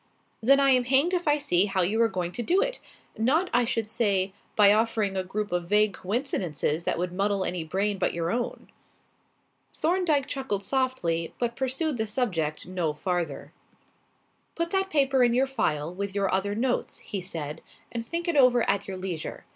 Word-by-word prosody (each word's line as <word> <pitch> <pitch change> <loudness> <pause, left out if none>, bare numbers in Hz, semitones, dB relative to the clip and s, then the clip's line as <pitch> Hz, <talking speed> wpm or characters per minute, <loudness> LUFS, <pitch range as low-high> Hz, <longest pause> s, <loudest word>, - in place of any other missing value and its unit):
"Then 275 +5 +5
I 275 -1 +4
am 250 -1 +3
hanged 275 +8 +3
if 350 -3 -1
I 295 0 +4
see 200 -11 +3
how 195 -2 0
you 215 +6 +1
are 230 - +5
going 180 -4 -3
to 240 - -5
do 350 - +2
it. - - -1 0.4
Not, 310 +11 +2
I 240 0 +4
should 230 -2 -1
say, 200 -4 +1 0.2
by 205 -1 +7
offering 215 -2 +1
a 190 - 0
group 210 +3 -4
of 175 -1 -1
vague 210 +1 +3
coincidences 180 - -2
that - - 0
would 175 +1 -2
muddle 195 0 0
any 180 -2 -2
brain 195 +5 -1
but - - +1
your 170 0 -2
own." 240 +1 -3 1.1
Thorndyke 320 -5 +1
chuckled 260 -9 -3
softly 195 -11 -1
but 235 -1 -2
pursued 270 +2 -1
the 220 -1 -1
subject 180 - -2
no 175 -4 -2
farther. 170 -2 -3 1.0
"Put 335 0 -2
that 385 -1 +1
paper 270 -4 +3
in 240 -1 +3
your 260 +2 +3
file 160 - -1
with 200 +1 -4
your 195 -2 0
other 200 +2 0
notes," 245 +3 -1
he 195 - -5
said, 155 -5 -5 0.3
"and 230 -1 -3
think 335 +8 -4
it 340 - 0
over 250 -4 +5
at 200 0 0
your 190 -1 -5
leisure. 185 -4 -5
215 Hz, 185 wpm, -27 LUFS, 185-265 Hz, 1.1 s, by